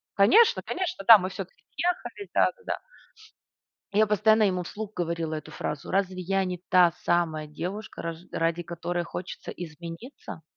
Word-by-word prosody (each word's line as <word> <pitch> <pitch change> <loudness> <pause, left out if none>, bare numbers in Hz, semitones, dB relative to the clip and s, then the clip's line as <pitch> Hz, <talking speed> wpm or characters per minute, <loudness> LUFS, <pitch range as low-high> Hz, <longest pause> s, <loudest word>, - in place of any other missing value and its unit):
Конечно, 430 - +6
конечно, 360 - -3
да, 225 -2 +12
мы 185 -1 -3
всё-таки 190 -1 -8
съехались, 360 +3 -2
да-да-да. 480 -2 +1 1.1
И 205 - +1
я 215 - +6
постоянно 215 +1 +4
ему 185 -3 +1
вслух 210 +4 -7
говорила 165 -2 -2
эту 155 - -6
фразу: 145 -1 -5
"Разве 190 -1 0
я 195 +2 0
не 180 -1 -3
та 180 -3 +6
самая 160 -3 +1
девушка, 180 +8 -6
раж 165 -1 -4
ради 165 +1 0
которой 175 +1 -3
хочется 175 +2 -7
измениться? 170 - -9
180 Hz, 150 wpm, -27 LUFS, 170-210 Hz, 1.1 s, да